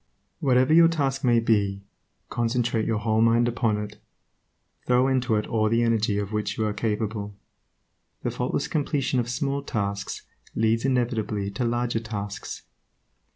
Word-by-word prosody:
Whatever 130 +1 +3
your 165 0 +8
task 140 -4 -1
may 120 -2 +4
be, 100 -3 +1 0.5
concentrate 120 -1 0
your 115 -2 +1
whole 110 +1 +1
mind 115 +1 +4
upon 115 -3 0
it, 105 0 -6 0.9
throw 125 +1 +4
into 130 -3 +1
it 105 - 0
all 110 -2 +1
the 115 +1 +2
energy 110 -3 +1
of 105 0 -3
which 105 -1 -2
you 110 - 0
are 105 - -1
capable. 105 -2 -2 0.9
The - - -1
faultless 130 +4 -2
completion 145 -4 0
of 120 0 -2
small 140 +2 -1
tasks 100 -6 -3 0.3
leads 115 +2 +1
inevitably 110 -6 0
to 110 +5 -2
larger 120 0 0
tasks. 105 -3 -6
115 Hz, 150 wpm, -25 LUFS, 105-125 Hz, 0.9 s, your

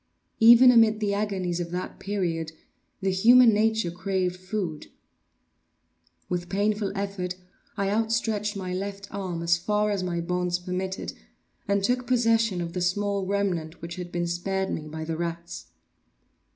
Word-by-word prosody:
Even 240 +3 +9
amid 225 -2 +5
the 205 -2 0
agonies 190 -4 -1
of 170 -1 -3
that 180 +1 -5
period, 170 -5 -2 0.5
the 190 0 +1
human 235 +5 +6
nature 220 -3 +1
craved 185 0 -1
food. 185 -4 -4 1.4
With 175 -1 -3
painful 205 +1 0
effort 195 -2 -3 0.4
I 200 -1 0
outstretched 220 -1 0
my 185 -2 -4
left 200 +1 -5
arm 185 -4 -4
as 170 0 +3
far 210 +3 0
as 200 -2 -1
my 175 -2 -2
bonds 180 +1 -1
permitted, 185 +1 -4 0.5
and 200 0 +1
took 245 +3 0
possession 225 -6 +2
of 170 -1 -5
the 180 - -3
small 200 +1 0
remnant 180 -5 -1
which 170 +2 -7
had 175 -1 -6
been 175 0 -1
spared 190 +3 -2
me 155 - -4
by 160 +1 -6
the 160 0 -3
rats. 170 - -5
190 Hz, 150 wpm, -26 LUFS, 175-210 Hz, 1.4 s, Even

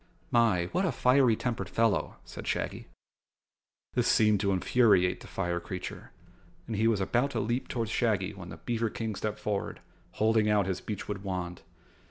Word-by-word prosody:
"My, 115 -8 +3
what 185 - +1
a 185 - +2
fiery 125 -2 +4
tempered 120 0 -3
fellow," 115 -2 +1
said - - -9
Shaggy. - - -2 1.1
This - - +1
seemed 105 -2 +4
to 100 +1 +1
infuriate 95 -2 +3
the - - -12
fire 85 -2 -2
creature 90 +1 -7 0.5
and 115 - -4
he 110 +2 +2
was 110 -3 +2
about 120 +8 +1
to - - +2
leap 120 +5 -1
toward 115 -2 -2
Shaggy 105 -4 0
when 90 -3 -9
the - - -8
beaver 115 -1 -1
King 110 0 -3
stepped 105 +1 -3
forward, 105 -2 -3 0.3
holding 110 0 +2
out 105 -2 +3
his 95 -1 -2
beechwood 105 -1 -4
wand. 90 -3 -4
105 Hz, 170 wpm, -29 LUFS, 95-115 Hz, 1.1 s, fiery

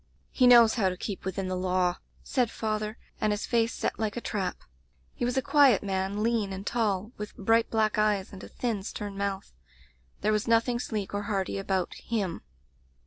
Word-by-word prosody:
"*He 255 - +4
knows 235 -2 +8
how 200 -6 +2
to 180 - -5
keep 195 -1 -5
within 190 0 -2
the 185 - -2
law,' 180 -1 +1 0.3
said 250 -4 +1
father, 215 0 -3 0.2
and 215 - +1
his 205 0 -2
face 230 -2 +2
set - - -3
like 220 0 -2
a - - 0
trap. 195 -6 -2 0.6
He - - -5
was 245 +2 0
a 265 - +2
quiet 275 -9 +5
man, 195 +1 -1
lean 225 -4 +1
and 190 +1 -6
tall, 215 -3 0
with 210 0 -7
bright 225 +3 +2
black 215 -1 +1
eyes 210 -2 +1
and 190 - -9
a - - -8
thin, 230 -5 -2
stern 205 0 -6
mouth. 195 - -3 0.7
There 215 - +2
was 215 +1 0
nothing 230 +1 +3
sleek 210 -5 -4
or 205 - -1
hearty 195 -1 -1
about 190 -2 -1
him. 200 -7 -3
210 Hz, 195 wpm, -28 LUFS, 195-230 Hz, 0.7 s, knows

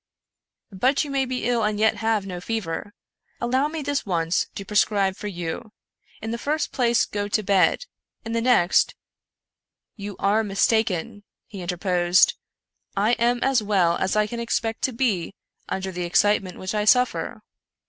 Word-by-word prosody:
" - - -66 0.3
But 255 +10 +2
you 290 - -6
may 270 -1 +1
be 255 -2 -3
ill 240 -2 +1
and 210 0 0
yet 220 0 +3
have 220 -3 0
no 180 -2 -6
fever. 205 -2 -4 0.5
Allow 260 +4 +1
me 310 -1 -5
this 285 0 -1
once 170 -3 0
to 195 - -6
prescribe 200 -2 +2
for 210 - -6
you. 180 +4 -5 0.5
In 220 - -3
the 235 - -3
first 300 +3 -1
place 240 -3 +2
go 205 0 -3
to 215 +1 0
bed. 200 - +2 0.4
In 225 - -4
the 230 0 0
next 230 -8 +3 0.3
" - - -66
" - - -65
You 205 -1 -5
are 210 +3 +2
mistaken," 205 0 0 0.2
he 200 -4 -9
interposed, 180 - +2 0.4
" - - -32
I - - +4
am 240 +1 +2
as 265 -3 +3
well 190 -5 +2
as 190 - -1
I 210 0 +3
can 235 +3 -6
expect 230 -1 -2
to 260 - -1
be 220 -7 -1 0.3
under 190 0 -3
the 180 -1 -4
excitement 190 +1 +2
which 185 +2 -4
I 210 -1 0
sufifer. 250 +3 +2
210 Hz, 180 wpm, -24 LUFS, 190-235 Hz, 0.5 s, I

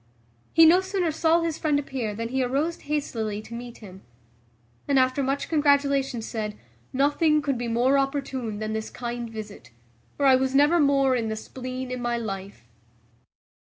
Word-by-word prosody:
He 325 0 +7
no 350 +4 +6
sooner 375 -3 -1
saw 325 +2 +2
his 330 -2 -2
friend 300 -2 +1
appear 260 -7 -3
than 230 +1 -4
he 265 +1 0
arose 285 +7 -1
hastily 230 -8 -3
to 230 - -11
meet 240 0 -8
him; 190 0 -12 0.9
and 280 - +2
after 255 +1 +2
much 275 +1 -1
congratulation 280 -5 +2
said, 215 -2 -4 0.3
"Nothing 295 +3 +2
could 285 -2 -1
be 240 0 -3
more 250 +4 +3
opportune 270 -5 -2
than 215 0 -3
this 220 0 -3
kind 240 -1 -5
visit; 210 - -9 0.5
for 285 - +1
I 265 -1 +7
was 265 +1 0
never 295 +5 +5
more 275 -3 +3
in 230 -2 -1
the 220 - -2
spleen 255 +3 -6
in 250 -1 -4
my 240 0 -1
life." 195 - -6
260 Hz, 170 wpm, -25 LUFS, 230-285 Hz, 0.9 s, He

